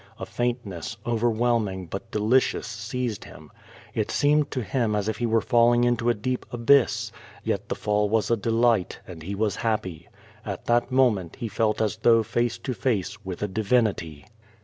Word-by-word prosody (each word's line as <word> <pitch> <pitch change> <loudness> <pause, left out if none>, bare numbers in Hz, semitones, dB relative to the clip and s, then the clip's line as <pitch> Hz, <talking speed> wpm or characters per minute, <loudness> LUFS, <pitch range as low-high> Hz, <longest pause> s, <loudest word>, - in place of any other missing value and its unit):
A - - -5
faintness, 120 -3 -3
overwhelming 115 -4 0
but 95 +7 -7
delicious, 115 +4 +1
seized 110 +1 -4
him. - - -13 0.4
It - - -1
seem 145 +1 +3
ed 145 - -4
to 125 - -3
him 110 +2 0
as 105 0 -1
if 110 -1 -2
he 120 - 0
were 115 0 +2
falling 120 0 +4
into 120 -1 +2
a 120 - +2
deep 125 +4 -2
abyss, 120 +3 +3 0.3
yet - - -2
the - - -1
fall 105 0 0
was 110 +1 +1
a - - +5
delight, 115 -2 +1
and 85 -3 -10
he 95 +5 -5
was 105 -1 -1
happy. 100 -8 -2 0.3
At - - -6
that 120 +2 +2
moment 115 -10 +2
he 115 - -4
felt 110 0 0
as 110 0 -1
though 115 0 +4
face 120 +2 -1
to 130 - -4
face 105 -5 -2
with 95 0 -5
a - - +1
divinity. 100 -7 0
115 Hz, 180 wpm, -25 LUFS, 105-120 Hz, 0.4 s, a